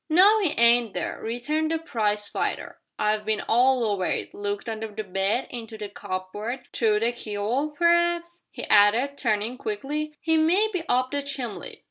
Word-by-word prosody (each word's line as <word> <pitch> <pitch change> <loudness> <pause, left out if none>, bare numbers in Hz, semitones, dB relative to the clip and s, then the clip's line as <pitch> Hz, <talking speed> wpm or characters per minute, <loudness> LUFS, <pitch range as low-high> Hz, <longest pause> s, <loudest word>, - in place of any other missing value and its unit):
"No 395 +7 +6
'e 360 -7 0
ain't 235 -2 +4
there," - - -3
returned 295 +8 -1
the 325 - +1
prize 210 -9 -1
fighter; - - -3 0.2
"I've 210 0 +1
bin 215 0 0
all 250 +2 +3
over 200 -4 0
it - - -2
looked 205 +2 -4
under 220 0 -4
the 215 0 -6
bed, 195 +5 0
into 225 -2 -6
the 210 -1 -6
cupboard, 205 +6 -5
through 215 -2 +2
the 230 +1 +2
key'ole; 240 +6 -3
p'r'aps," 345 0 +1
he - - -8
added, 225 +7 +4
turning 225 +1 -1
quickly, 305 -7 -4
"'e 320 0 +4
may 360 +8 +3
be 365 - -1
up 255 +1 +2
the 285 0 -1
chimbly!" 270 -6 -5
240 Hz, 170 wpm, -25 LUFS, 210-305 Hz, 0.2 s, No